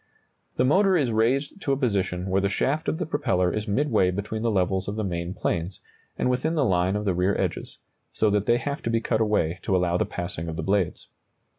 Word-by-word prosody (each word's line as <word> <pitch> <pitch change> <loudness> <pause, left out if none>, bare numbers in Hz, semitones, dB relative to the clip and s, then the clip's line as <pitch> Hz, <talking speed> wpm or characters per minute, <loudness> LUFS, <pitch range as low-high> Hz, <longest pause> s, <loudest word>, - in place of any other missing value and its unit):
] - - -46
The 125 - +3
motor 190 +6 +4
is 135 -7 +1
raised 130 - 0
to 140 - 0
a - - 0
position 95 -7 -1
where 95 +1 +2
the 100 - +1
shaft 145 +10 0
of - - -1
the 180 - -2
propeller 90 - 0
is 110 +1 -3
midway 105 -4 +2
between 100 +4 -3
the 115 - +1
levels 95 -2 0
of 100 - -3
the 110 - -2
main 85 -1 -3
planes, 85 0 -2 0.4
and - - 0
within 130 +6 0
the 145 -4 +2
line 95 -1 +2
of 105 0 -2
the 95 - +2
rear 90 +3 +1
edges, - - -3 0.3
so 110 -1 +1
that 105 0 0
they 120 - +4
have 140 +3 -4
to - - -2
be 115 0 +2
cut 115 -1 0
away 95 -5 +1
to 95 - 0
allow 90 -1 +2
the - - +1
passing 85 -2 -5
of 80 - -4
the - - -4
blades. 95 -2 0
105 Hz, 240 wpm, -25 LUFS, 90-125 Hz, 0.4 s, motor